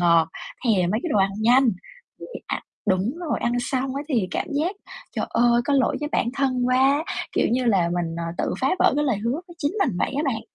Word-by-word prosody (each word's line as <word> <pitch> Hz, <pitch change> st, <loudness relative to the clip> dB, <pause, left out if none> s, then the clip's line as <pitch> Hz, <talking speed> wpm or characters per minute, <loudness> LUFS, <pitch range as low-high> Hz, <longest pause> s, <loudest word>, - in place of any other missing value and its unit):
ngọt, 170 Hz, -2 st, +4 dB, 0.4 s
thèm 185 Hz, -6 st, +2 dB
mấy 215 Hz, -, 0 dB
cái 345 Hz, -, -3 dB
đồ 210 Hz, -, +3 dB
ăn 195 Hz, 0 st, +3 dB
nhanh, 245 Hz, +3 st, +5 dB, 0.5 s
thì -, -, -7 dB, 0.2 s
ạ -, -, -3 dB, 0.2 s
đúng 195 Hz, +5 st, +1 dB
rồi, 345 Hz, -3 st, -2 dB
ăn 235 Hz, -, 0 dB
xong 260 Hz, +1 st, -2 dB
á 285 Hz, -, -2 dB
thì 225 Hz, -11 st, +1 dB
cảm -, -, -2 dB
giác, 335 Hz, +8 st, -1 dB, 0.4 s
trời -, -, -1 dB
ơi, 240 Hz, 0 st, +3 dB
có 285 Hz, -, +1 dB
lỗi 265 Hz, -3 st, +2 dB
với 295 Hz, -, -2 dB
bản 235 Hz, -, +1 dB
thân 255 Hz, -3 st, +1 dB
quá, 270 Hz, +4 st, +3 dB, 0.3 s
kiểu -, -, +2 dB
như 255 Hz, +1 st, +1 dB
là, 190 Hz, -7 st, +3 dB
mình, 170 Hz, -2 st, -2 dB
à, 170 Hz, -, -3 dB
tự -, -, -1 dB
phá 265 Hz, -, +2 dB
vỡ -, -, +4 dB
cái 295 Hz, -, +2 dB
lời 250 Hz, -6 st, +1 dB
hứa 230 Hz, +3 st, -1 dB, 0.2 s
với 345 Hz, -, -12 dB
chính 290 Hz, +2 st, -1 dB
mình 225 Hz, -, -1 dB
vậy -, -, 0 dB
á 290 Hz, -, +1 dB
bạn. 230 Hz, -5 st, -1 dB
245 Hz, 240 wpm, -23 LUFS, 200-275 Hz, 0.5 s, nhanh